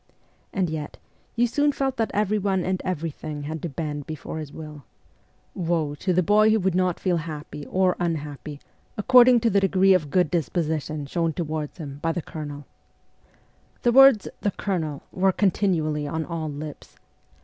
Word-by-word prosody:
And 185 -2 0
yet, 155 -2 -5 0.4
you 240 - +3
soon 290 +5 +2
felt 270 -2 -2
that 225 -1 0
everyone 205 -2 +1
and 185 0 -1
everything 155 -3 -4
had 155 +1 -5
to 170 - -3
bend 150 -1 -4
before 155 0 -6
his 150 -2 -7
will. 150 -2 -9 0.7
Woe 165 -4 -1
to 185 +6 -2
the 180 +1 +3
boy 210 +4 +5
who 220 0 +3
would 190 -1 +1
not 180 -1 +1
feel 180 -2 +1
THE 160 - -3
CORPS 155 -2 -5
OF - - -41
PAGES 150 0 -7
87 - - -14
happy - - -5
or 180 -1 +3
unhappy 150 -3 -4 0.4
according 245 +2 +6
to 230 - +2
the 200 - +4
degree 195 0 +4
of 160 -6 +1
good 180 -1 +2
dis 165 -7 0
position 155 -3 -2
shown 165 +2 -1
toward 155 -2 -4
him 145 -4 -7
by 165 - +1
the 165 -1 -3
Colonel. 145 -2 -7 1.2
The 240 - +4
words 270 -4 +7
' - - -40
the 205 - +1
Colonel 165 -8 -3
' - - -41
were 190 +1 +2
continually 170 -7 +1
on 160 +2 -2
all 165 -2 -4
lips. 150 +1 -8
165 Hz, 195 wpm, -24 LUFS, 150-195 Hz, 1.2 s, words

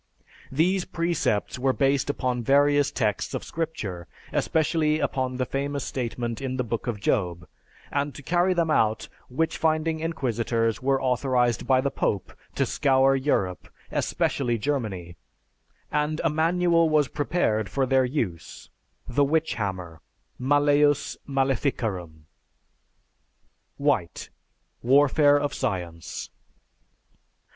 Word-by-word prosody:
These 180 +7 +1
precepts 165 - -1
were 130 0 +2
based 135 0 +1
upon 125 -3 -1
various 145 +3 +3
texts 105 -6 -1
of - - -4
scripture, 110 - -4 0.3
especially 155 -1 +1
upon 130 -3 -1
the 130 - 0
famous 140 +1 -3
statement 120 -2 -3
in 130 -1 -3
the 125 - 0
Book 115 +1 -4
of 115 -4 -2
Job; 90 -6 -1 0.4
and 140 0 -1
to 145 - -10
carry 180 +4 +2
them 165 -2 +1
out, 110 -6 +1 0.2
witch 160 +5 -1
finding 160 0 +1
inquisitors 115 -8 -1
were 135 +1 +2
authorized 125 -2 +1
by 130 -1 +4
the 140 +1 -1
Pope 100 -6 -2 0.2
to - - +2
scour 135 -1 +3
Europe, 115 -10 -1 0.2
especially 120 -1 0
Germany, 105 -10 -3 0.7
and 150 +1 0
a 165 - +2
manual 165 +1 +3
was 150 -2 +3
prepared 130 - 0
for 135 -1 0
their 130 0 +3
use, 120 - -4 0.4
the 140 +4 +2
Witch 160 +3 +1
Hammer, 90 -6 -4 0.4
Malleus 145 +2 +3
Maleficarum." 115 - -1 1.5
(_White: 140 - 0 0.5
"Warfare 145 +3 +5
of 145 0 -2
Science." 85 -3 -4
135 Hz, 120 wpm, -25 LUFS, 115-150 Hz, 1.5 s, Warfare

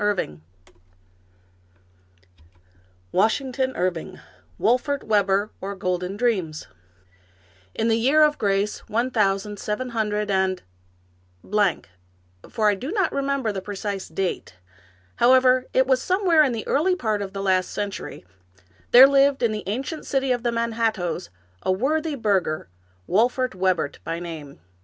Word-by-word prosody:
164 90 - -4 2.4
Washington 260 +5 0
Irving 180 +1 -3 0.4
Wolfert 255 +5 +1
Webber 205 -1 +1
or 200 +1 -5
Golden 185 +1 -3
Dreams 190 -10 0
T - - -20 1.1
N 225 - 0
the 225 -1 +3
year 285 +6 +4
of 300 0 +2
grace 200 0 0
one 235 +4 0
thousand 205 -2 0
seven 215 +5 -3
hundred 210 -3 -1
and 190 -1 0 0.4
— 90 0 -37
blank 200 - 0 0.3
— 90 0 -21
for 215 -1 0
I 205 - +4
do 255 - -5
not 385 -5 +1
remember 275 -4 -1
the 195 -2 -4
precise 200 0 -5
date; 180 - -3 0.6
however, 255 +1 +4
it 260 - +3
was 260 -1 +2
somewhere 365 -3 +3
in 275 - +1
the 225 -2 -4
early 360 +6 +2
part 215 - -1
of 195 -1 -6
the 195 0 -4
last 185 -1 +1
century, 205 - -5 0.3
— 90 0 -32
there 250 +2 +11
lived 275 -1 +3
in 230 - +3
the 215 -1 -3
ancient 270 +8 -4
city 270 -1 0
of 245 -1 0
the 240 0 0
Manhattoes 225 - -1 0.3
a - - 0
worthy 300 - 0
burgher, 190 - -1 0.4
Wolfert 250 +5 +1
Webber 185 -2 0
by 165 0 -3
name. 160 - -8
210 Hz, 145 wpm, -23 LUFS, 185-255 Hz, 2.4 s, there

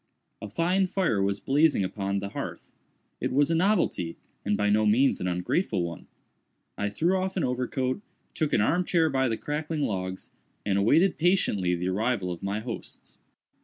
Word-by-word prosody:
A 105 - -6
fine 180 - +1
fire 175 - +1
was 100 +1 0
blazing 145 -3 +3
upon 100 +1 -2
the 100 - -4
hearth. - - -6 0.5
It - - -2
was 145 +4 +3
a - - +3
novelty, 165 - +1 0.3
and 105 0 0
by 105 0 +1
no 105 +1 +3
means 130 +6 +3
an 90 - -1
ungrateful 90 - 0
one. 85 -1 -6 0.7
I 105 - -1
threw 170 - +1
off 190 +1 -2
an 180 - +1
overcoat, 125 +4 -1 0.3
took 155 -3 -1
an - - +3
arm 175 +12 +2
chair 165 -3 +2
by 130 -1 +2
the 115 -2 -1
crackling 150 +1 -3
logs, 95 -6 -3 0.3
and 100 -1 +2
awaited 160 - +3
patiently 105 - +2
the 90 +1 -2
arrival 100 -1 0
of 85 - -6
my 100 +2 -2
hosts. 115 0 -8
120 Hz, 175 wpm, -27 LUFS, 100-160 Hz, 0.7 s, blazing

